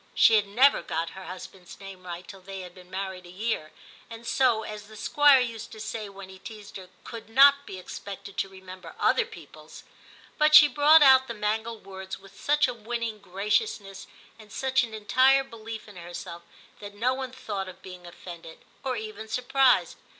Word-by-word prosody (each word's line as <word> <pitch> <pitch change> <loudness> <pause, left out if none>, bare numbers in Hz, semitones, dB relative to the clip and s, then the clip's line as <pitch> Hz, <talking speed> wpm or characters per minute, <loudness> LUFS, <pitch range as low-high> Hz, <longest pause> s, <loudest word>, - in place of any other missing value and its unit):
* - - -33
She - - +6
had 210 -2 +4
never 255 +8 +4
got 165 +1 -3
her 190 -1 -10
husband's 185 0 -10
name 190 -2 -11
right 175 +1 -7
till 195 -1 -11
they 195 +1 -8
had 180 -1 -10
been 180 -1 -16
married 190 -1 -5
a - - -13
year, 185 -4 -3 0.4
and 230 0 -10
so, 235 -3 +2
as 210 -1 -8
the 215 0 -13
Squire 290 +4 +5
used 230 -2 -5
to 220 - -11
say 215 -1 -5
when 195 -1 -11
he 190 0 -13
teased 210 -1 -10
her, 185 -1 -12
could 230 -1 -9
not 280 +4 +6
be 190 - -7
expected 195 +1 -9
to 195 - -1
re 190 0 -14
member 185 0 -11
other 475 -2 +2
people's, 440 - -13 0.6
but 305 0 +5
she 305 -1 +11
brought 295 +3 +6
out 265 -1 +7
the 235 - -5
mangled 220 +1 -3
words 190 -1 -7
with 195 0 -17
such 295 +1 +3
a 250 - -3
winning 230 -1 -4
graciousness 200 - -2 0.3
and 215 -1 -15
such 265 +3 +1
an 225 -2 -6
entire 255 +6 +4
belief 225 -4 -9
in 205 -3 -13
herself, 175 0 -8 0.4
that 205 0 -10
no 245 +5 +1
one 260 -1 -5
thought 205 -7 -5
of 185 0 -14
being 180 -1 -11
offended, 170 -1 -11 0.2
or 260 -2 -1
even 220 0 -7
surprised. 255 +3 +2
210 Hz, 195 wpm, -27 LUFS, 190-250 Hz, 0.6 s, she